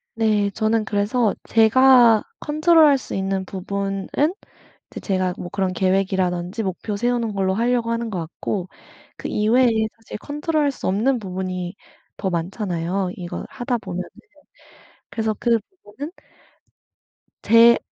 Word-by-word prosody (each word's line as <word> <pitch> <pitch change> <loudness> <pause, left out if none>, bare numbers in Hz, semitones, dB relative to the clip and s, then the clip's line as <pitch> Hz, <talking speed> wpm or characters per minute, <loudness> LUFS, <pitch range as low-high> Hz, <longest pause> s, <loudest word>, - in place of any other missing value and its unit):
네. 215 -3 +1
저는 220 +1 0
그래서 215 +2 +1 0.2
제가 230 0 +6 0.2
컨트롤할 310 -1 +4
수 - - -7
있는 195 0 -1
부분은 195 +1 -4 0.8
이제 - - -7
제가 185 -2 0
뭐 175 - -6
그런 190 -1 -1
계획이라든지 185 +1 0
목표 195 +2 -3
세우는 240 -1 0
걸로 190 -1 0
할려고 235 +1 +1
하는 230 -1 -2
것 185 - -3
같고 175 +3 -4 0.5
그 - - -5
이외에 235 +5 +3 0.3
사실 225 -2 -9
컨트롤할 295 +1 -1
수 270 - -6
없는 225 +8 +2
부분이 185 -2 -4 0.4
더 195 - -2
많잖아요 180 +1 -2
이걸 175 -2 -6
하다 245 -1 -2
보면은. 185 -3 -5 1.0
그래서 220 -1 -1
그 235 -2 +2 0.3
부분은 270 +10 -7 1.3
제 230 +1 +7
210 Hz, 275 characters per minute, -22 LUFS, 190-235 Hz, 1.3 s, 제